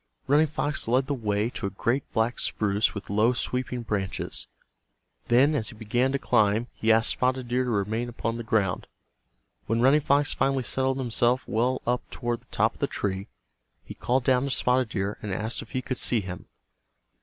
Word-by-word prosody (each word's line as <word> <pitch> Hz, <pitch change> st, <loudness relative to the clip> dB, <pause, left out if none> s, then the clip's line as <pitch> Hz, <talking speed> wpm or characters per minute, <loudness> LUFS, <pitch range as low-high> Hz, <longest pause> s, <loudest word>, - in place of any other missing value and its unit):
Running 150 Hz, +3 st, +4 dB
Fox 145 Hz, -3 st, -1 dB
led 130 Hz, +3 st, +2 dB
the 145 Hz, -, -2 dB
way 110 Hz, -2 st, -1 dB
to 100 Hz, -, -4 dB
a -, -, -2 dB
great 120 Hz, +7 st, -1 dB
black 115 Hz, +2 st, 0 dB
spruce 105 Hz, 0 st, +1 dB
with 100 Hz, -1 st, -6 dB
low 110 Hz, +4 st, +3 dB
sweeping 125 Hz, 0 st, -2 dB
branches. 100 Hz, -4 st, -2 dB, 0.8 s
Then, 130 Hz, +6 st, +4 dB
as 115 Hz, -7 st, -1 dB
he -, -, -10 dB
began 120 Hz, +4 st, 0 dB
to 140 Hz, -, +1 dB
climb, 110 Hz, -3 st, +2 dB
he 110 Hz, -, +1 dB
asked 110 Hz, +1 st, +4 dB
Spotted 130 Hz, -1 st, 0 dB
Deer 125 Hz, +1 st, +1 dB
to -, -, -2 dB
remain 110 Hz, +3 st, -1 dB
upon 115 Hz, -1 st, -3 dB
the 120 Hz, -, -5 dB
ground. 105 Hz, -5 st, 0 dB, 0.8 s
When 115 Hz, +1 st, +1 dB
Running 135 Hz, +4 st, +5 dB
Fox 145 Hz, +1 st, +2 dB
finally 135 Hz, -1 st, +1 dB
settled 130 Hz, +2 st, 0 dB
himself 125 Hz, 0 st, +1 dB
well 125 Hz, +3 st, 0 dB
up 125 Hz, +1 st, +1 dB
toward 120 Hz, -1 st, -3 dB
the -, -, -27 dB
top -, -, +1 dB
of -, -, -20 dB
the -, -, +1 dB
tree, 95 Hz, +1 st, -3 dB, 0.6 s
he -, -, -9 dB
called 125 Hz, +1 st, 0 dB
down 130 Hz, 0 st, +3 dB
to -, -, -2 dB
Spotted 125 Hz, -2 st, +1 dB
Deer 100 Hz, -1 st, -3 dB
and 105 Hz, -, -5 dB
asked 110 Hz, +4 st, -1 dB
if -, -, -11 dB
he 130 Hz, -, -3 dB
could 130 Hz, -1 st, -3 dB
see 115 Hz, -3 st, +1 dB
him. 90 Hz, -2 st, -8 dB
120 Hz, 195 wpm, -26 LUFS, 110-130 Hz, 0.8 s, Running